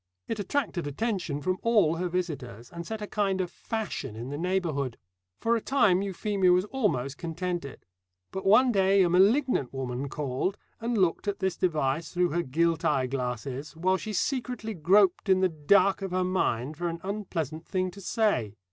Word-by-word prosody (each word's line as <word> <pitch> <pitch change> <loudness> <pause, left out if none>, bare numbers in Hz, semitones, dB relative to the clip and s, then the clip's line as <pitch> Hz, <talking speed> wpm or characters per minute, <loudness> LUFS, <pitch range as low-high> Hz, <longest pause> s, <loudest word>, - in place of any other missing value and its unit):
It 220 - -3
attracted 205 - -1
attention 170 - -2
from 185 0 0
all 205 -9 +3
her 180 +1 -1
visitors, 145 - -4
and 170 0 -7
set 220 -1 -4
a - - -2
kind 200 -2 0
of 180 -1 -2
fashion 210 - -4
in 120 +3 -6
the 145 - -4
neighbourhood. 165 -9 -1 0.4
For 230 +1 +2
a 230 - -1
time 210 -9 +3
Euphemia 195 -1 +1
was 180 +2 +3
almost 140 - -1
contented. 170 -4 -4 0.5
But 190 - -4
one 245 +6 +6
day 195 -2 +4
a 175 - +2
malignant 200 - +3
woman 135 0 -4
called, 145 +7 -2 0.2
and 230 0 -1
looked 185 +1 +1
at 200 -1 0
this 190 -1 -1
device 155 -3 0
through 180 -1 +2
her 170 +3 +1
gilt 165 +3 0
eye 135 -5 +2
glasses, 130 +3 -4
while 185 +3 +2
she 215 - -5
secretly 230 0 -2
groped 190 +3 +3
in 190 0 +5
the 185 - +4
dark 185 +6 +3
of 195 - -3
her 185 +1 0
mind 155 -7 0
for 175 +1 -2
an 165 0 -5
unpleasant 170 -6 -4
thing 185 -1 -1
to 200 - -12
say. 195 - 0
180 Hz, 180 wpm, -28 LUFS, 150-200 Hz, 0.5 s, one